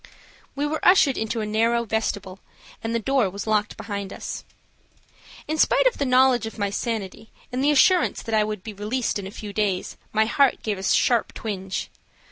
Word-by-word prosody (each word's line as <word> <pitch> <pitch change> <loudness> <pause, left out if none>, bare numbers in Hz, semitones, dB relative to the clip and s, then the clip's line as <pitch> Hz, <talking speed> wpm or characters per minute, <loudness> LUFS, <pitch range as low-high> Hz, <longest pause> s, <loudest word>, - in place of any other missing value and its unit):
We 285 +1 -1
were 310 +1 -3
ushered 340 -8 +5
into 220 +1 -2
a - - -2
narrow 230 +2 +1
vestibule, 205 -3 -3 0.4
and 225 +1 -2
the - - +2
door 255 -2 +1
was 200 +2 -6
locked 210 -1 0
behind 200 -3 -5
us. - - -6 1.0
In 310 +1 -2
spite - - +4
of - - +2
the 280 - 0
knowledge 255 -2 +4
of 220 - -9
my 200 -2 -1
sanity 220 -1 -4 0.2
and 255 +2 -1
the 290 - +4
assurance 345 +5 +4
that 225 - -5
I 215 -1 +4
would 210 -3 -4
be 220 - -7
released 210 +3 -2
in 195 - -6
a - - -7
few 205 0 -8
days, 200 -4 -1
my 220 0 +3
heart 275 +4 +2
gave 210 -3 -2
a - - -7
sharp 235 +3 +2
twinge. 195 -3 -4
220 Hz, 195 wpm, -24 LUFS, 205-255 Hz, 1.0 s, ushered